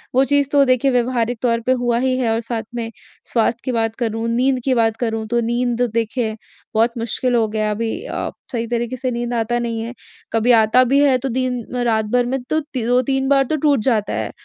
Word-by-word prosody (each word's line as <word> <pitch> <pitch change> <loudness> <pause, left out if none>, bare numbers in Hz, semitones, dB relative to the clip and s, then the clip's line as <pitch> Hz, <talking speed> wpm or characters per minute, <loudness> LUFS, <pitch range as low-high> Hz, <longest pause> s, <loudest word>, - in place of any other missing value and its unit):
वो 265 - +5
चीज़ 285 0 +2
तो 285 -1 +5
देखिए 255 +1 +2
व्यवहारिक 245 -1 0
तौर 235 -2 +1
पे - - +4
हुआ 240 -1 +1
ही 255 0 +1
है 240 -3 0
और 225 +1 0
साथ 230 -1 -4
में 230 -1 -3 0.4
स्वास्थ्य 230 0 +1
की 255 - 0
बात 225 -2 -1
करूँ, 225 -1 -2
नींद 255 +3 +1
की 265 - +3
बात 225 -2 +2
करूँ 225 -2 -2
तो 240 +2 +1
नींद 240 +1 -1
देखिए 225 -1 -1 0.4
बहुत 225 +2 +3
मुश्किल 240 +2 -1
हो 225 -2 +2
गया 215 0 -1
है 210 - 0
अभी। 225 +2 -3
अ, - - -3 0.2
सही 230 -2 -2
तरीके 240 +1 -2
से 255 -1 -2
नींद 240 0 -3
आता 240 +1 0
नहीं 230 -1 -2
है 235 +2 -6 0.4
कभी 225 +2 +3
आता 220 +4 +4
भी 280 - +5
है 265 -3 +4
तो 265 +2 -3
दिन 250 0 -1 0.2
रात 220 -2 +1
भर 245 0 +3
में 260 +1 -2
तो 310 - +2
ती 265 -6 -5
2-3 260 +2 +1
बार 275 -1 +4
तो 310 - -1
टूट 290 -3 +2
जाता 215 -4 0
है। - - -2
240 Hz, 230 wpm, -20 LUFS, 230-255 Hz, 0.4 s, वो